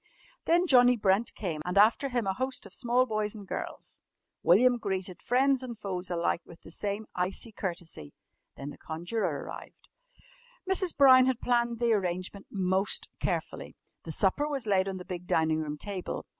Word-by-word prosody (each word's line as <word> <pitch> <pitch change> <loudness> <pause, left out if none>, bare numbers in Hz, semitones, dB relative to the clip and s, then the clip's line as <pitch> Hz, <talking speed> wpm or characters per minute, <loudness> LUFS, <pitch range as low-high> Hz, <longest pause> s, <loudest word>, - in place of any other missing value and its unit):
Then 345 +2 +3
Johnnie 250 -5 +6
Brent 200 +2 +1
came 165 -7 -4
and 180 +3 -3
after 225 +7 +4
him 240 -3 -1
a 190 - 0
host 260 +5 -3
of - - -12
small 245 0 +2
boys 215 -2 -2
and 205 -2 -10
girls. - - -6 0.4
William 245 +8 +5
greeted 190 -4 -3
friends 265 +2 +2
and 245 -3 -6
foes 185 -3 -4
alike 170 0 0
with 170 - -15
the - - -13
same 205 +4 -3
icy 185 +5 -2
courtesy. 170 - -6 0.5
Then 140 +1 -6
the - - -13
conjurer 175 +8 -3
arrived. - - -11 0.8
Mrs. 375 -2 0
Brown 260 -2 +7
had 260 -2 0
planned 235 -1 +1
the 235 0 +2
arrangement 185 0 -2
most 190 0 0
carefully. - - -3 0.3
The - - -7
supper 295 - +1
was 280 -5 -3
laid 195 -2 +2
on 190 -1 -3
the 180 - -9
big 180 -1 -6
dining 160 -1 +2
room 150 -1 -4
table. 190 +2 -5
205 Hz, 170 wpm, -29 LUFS, 180-245 Hz, 0.8 s, Brown